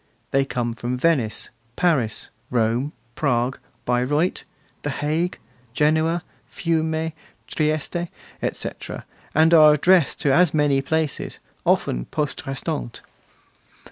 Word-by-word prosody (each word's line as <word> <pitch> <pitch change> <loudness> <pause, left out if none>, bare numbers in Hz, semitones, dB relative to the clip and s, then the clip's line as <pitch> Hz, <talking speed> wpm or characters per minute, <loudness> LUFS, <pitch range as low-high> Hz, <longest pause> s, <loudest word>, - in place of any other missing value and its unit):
They 135 0 +3
come 120 -3 -2
from 120 +2 -3
Venice, 130 -7 +1 0.2
Paris, 135 -12 +1 0.2
Rome, 120 +4 +1 0.2
Prague, 125 -1 0 0.3
Bayreuth, 135 +8 +1 0.4
The 145 - -3
Hague, 155 +5 -1 0.4
Genoa, 160 +3 +2 0.3
Fiume, 160 -1 -1 0.3
Trieste, 155 +3 -1 0.3
etc., - - -4 0.3
and 160 +2 +5
are 155 -2 +8
addressed 175 +1 +3
to 140 - +3
as 175 0 +4
many 145 -2 +3
places, 155 +1 -1 0.3
often - - +2
poste 150 -3 -3
restante. 95 - -4
150 Hz, 105 wpm, -23 LUFS, 125-160 Hz, 0.4 s, are